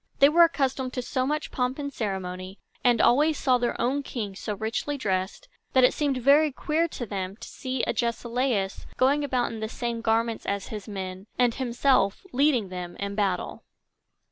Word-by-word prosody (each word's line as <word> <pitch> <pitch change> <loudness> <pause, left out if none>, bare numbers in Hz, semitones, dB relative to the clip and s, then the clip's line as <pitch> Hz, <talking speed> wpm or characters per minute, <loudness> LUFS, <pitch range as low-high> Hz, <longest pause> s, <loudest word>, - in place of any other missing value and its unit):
They 280 - +7
were 340 +3 +6
accustomed 265 -5 -1
to 250 - -3
so 255 +1 -1
much 300 +1 -2
pomp 250 0 -1
and 280 -1 -4
ceremony, 190 -3 -4 0.3
and 240 -2 +4
always 295 +7 +4
saw 255 -1 +3
their 240 0 -1
own 265 +4 +1
king 215 -8 -5
so 210 +2 -4
richly 220 +7 -2
dressed, 190 - -2 0.3
that 260 - +5
it 250 - +6
seemed 285 -3 0
very 285 +4 +5
queer 315 +5 0
to 255 -6 -6
them 195 -2 -4
to - - -9
see 260 -2 -3
Agesilaus 235 -3 -1
going 280 +3 +3
about 255 -3 0
in 225 - -6
the 220 0 -3
same 235 -1 -3
garments 225 0 0
as 200 -1 -2
his 210 -1 -6
men, 190 -1 -6
and 245 -2 +3
himself 245 - +1
leading 255 -7 +2
them 180 -1 -6
in 200 0 -4
battle. 195 -3 -1
240 Hz, 180 wpm, -26 LUFS, 200-270 Hz, 0.3 s, They